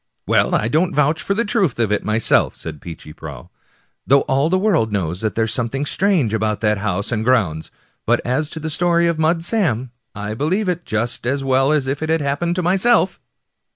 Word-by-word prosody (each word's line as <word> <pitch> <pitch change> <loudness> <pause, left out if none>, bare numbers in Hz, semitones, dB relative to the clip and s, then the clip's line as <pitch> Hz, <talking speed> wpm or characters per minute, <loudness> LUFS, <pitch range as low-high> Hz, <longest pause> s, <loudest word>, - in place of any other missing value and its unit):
" - - -53
Well, - - +2
I 105 - +1
don't 160 +9 +1
vouch 150 +2 +2
for 195 - -1
the 230 +2 0
truth 200 - 0
of 115 -3 0
it 105 - 0
myself," 110 +1 +2
said 75 -3 -8
Peechy 80 -2 -10
Prauw, - - -10 0.3
*' - - -41
though 140 +1 +5
all 140 +4 +1
the 185 - +2
world 180 - +1
knows 90 -3 -2
that 110 -1 -2
there's 110 -1 0
something 130 +4 -2
strange 170 - +1
about 110 -1 0
that 105 -2 +1
house 100 0 -2
and 110 -2 -1
grounds; 100 -11 +1 0.4
but - - +3
as 130 +5 0
to 160 - -6
the 160 0 -4
story 170 +1 +2
of 170 -2 0
Mud 165 +1 +1
Sam, 140 - 0 0.2
I 105 +1 -4
believe 180 - -1
it 175 -1 -2
just 115 +2 -2
as 135 +2 -1
well 135 +1 +2
as 150 -3 +1
if 135 +2 -3
it 160 - -3
had 160 -1 +1
happened 145 +5 -1
to 180 - -1
myself." 195 +3 +2
135 Hz, 220 wpm, -19 LUFS, 110-170 Hz, 0.4 s, though